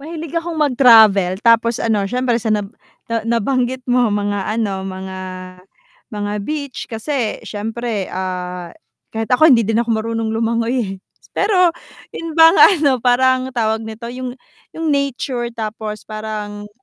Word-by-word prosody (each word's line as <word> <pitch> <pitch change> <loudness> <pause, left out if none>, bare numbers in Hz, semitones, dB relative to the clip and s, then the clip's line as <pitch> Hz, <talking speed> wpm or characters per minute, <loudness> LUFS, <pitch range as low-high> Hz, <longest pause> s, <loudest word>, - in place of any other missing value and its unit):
mahilig 325 +1 -7
akong 335 -1 -2
mag-travel, 220 -9 +5
tapos 230 0 +3
ano 215 -3 +1
siyempre 245 +3 0
sa 225 -2 -1
nab 205 -2 -1 0.4
na 230 -1 -2
nabanggit 250 +3 0
mo 245 -3 +3
mga 205 -1 -1
ano, 205 -3 -2
mga, 190 0 -6 0.9
mga 205 0 -3
beach, 285 -2 -4
kasi 230 0 -3
siyempre 225 0 -4
ah, 180 -1 -4 0.4
kahit 225 +2 -4
ako 315 +6 +6
hindi 235 -6 +5
din 225 +2 +1
ako 235 - -3
marunong 225 0 -2
lumangoy 230 +2 0
eh. 195 - -5 0.4
Pero 365 -4 +3 0.4
yun 330 -1 -6
bang 325 0 +7
ano 290 - +5
parang 255 +1 +2
tawag 220 -1 +1
nito, 220 +1 -9
yung 255 0 -6 0.4
yung 320 -2 0
nature 265 -3 -1
tapos 215 -1 -5
parang 210 -1 -6
230 Hz, 140 wpm, -18 LUFS, 210-260 Hz, 0.9 s, bang